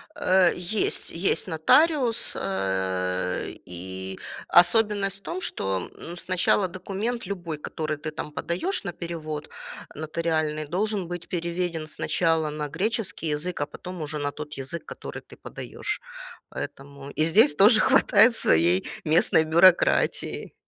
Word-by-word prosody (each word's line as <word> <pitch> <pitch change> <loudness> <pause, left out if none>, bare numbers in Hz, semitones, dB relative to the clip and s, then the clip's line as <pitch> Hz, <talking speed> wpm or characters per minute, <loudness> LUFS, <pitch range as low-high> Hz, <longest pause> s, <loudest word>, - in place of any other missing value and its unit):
Э, 185 -1 +4
есть, 180 +4 0
есть 180 +3 +1
нотариус, 240 - +3
э, 95 - -1
и 95 +2 -7 0.3
особенность 195 +2 +4
в - - -33
том, 370 - -5
что, 95 - -2
м, 170 +1 -9
сначала 185 +2 +1
документ 195 +6 -4
любой, 175 -5 -5
который 155 0 -4
ты, 155 +1 -5
там, 150 - -6
подаешь 195 - -2
на 175 - -3
перевод 155 -3 -6 0.5
нотариальный, 155 0 -1
должен 190 +3 -2
быть 175 -1 -6
переведен 170 -2 -3
сначала 160 0 0
на 150 0 -3
греческий 195 0 -2
язык, 175 +4 -4
а - - +1
потом 180 +3 -9
уже 150 0 -4
на 145 0 -1
тот 150 0 -8
язык, 135 +5 -6
который - - -8
ты - - -15
подаешь. 420 - -5 0.5
Поэтому 140 0 -8
и 155 - 0
здесь 215 - +5
тоже 215 +3 +6
хватает 220 +2 +5
своей 85 +3 +3 0.2
местной 160 +1 +4
бюрократии. 170 +3 +3
170 Hz, 130 wpm, -25 LUFS, 150-190 Hz, 0.5 s, тоже